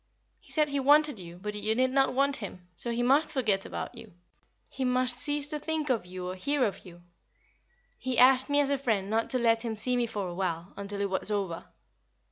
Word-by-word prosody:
He - - -17
said 305 -2 +2
he 280 0 -1
wanted 290 -2 +4
you, 175 -1 -9
but 210 +3 -5
you 215 +1 0
did 255 +1 +2
not 270 -1 +2
want 280 +1 +2
him, 185 -4 -8
so 235 - -2
he 235 +1 -1
must 275 +5 +3
forget 215 -8 0
about - - -5
you. 230 -4 -12 0.5
He 265 - -5
must 255 0 +1
cease 290 +3 -1
to 300 -1 -3
think 310 -2 -2
of 225 -7 -1
you 180 0 -6
or 180 - -3
hear 280 +9 0
of 205 - -4
you. 175 0 -14 1.0
He 260 -1 -2
asked 260 +2 +6
me 285 0 +3
as 280 -1 0
a 280 - +1
friend 215 -7 -1
not 225 +1 0
to 255 - +2
let 230 -2 +2
him 225 -2 -3
see 250 +4 0
me 240 -1 +1
for 205 -4 -4
a 175 - -6
while, 175 -1 -3
until 200 0 -5
it 200 - 0
was 190 - +4
over. 195 -5 -2
235 Hz, 230 wpm, -29 LUFS, 200-270 Hz, 1.0 s, asked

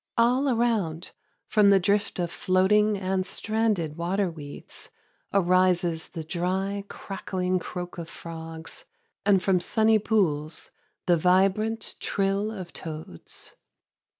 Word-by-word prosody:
All 250 +4 +3
around, 220 -9 0 0.3
from 210 -2 +4
the 195 -1 +6
drift 200 +3 +1
of 175 -2 -1
floating 205 +3 +3
and 190 0 0
stranded 210 -7 -1
water 180 +2 0
weeds, 145 -3 -9 0.4
arises 180 -3 +2
the 165 -3 -6
dry, 190 +4 -2
crackling 185 -2 -2
croak 180 0 -6
of 165 -1 -6
frogs, 165 - -7 0.4
and 195 -3 +5
from 190 -2 +3
sunny 220 +4 +3
pools 160 -8 0 0.3
the 175 -1 +4
vibrant 195 +6 +2
trill 195 +1 0
of 190 -5 -7
toads. 155 - -7
185 Hz, 115 wpm, -26 LUFS, 170-205 Hz, 0.4 s, the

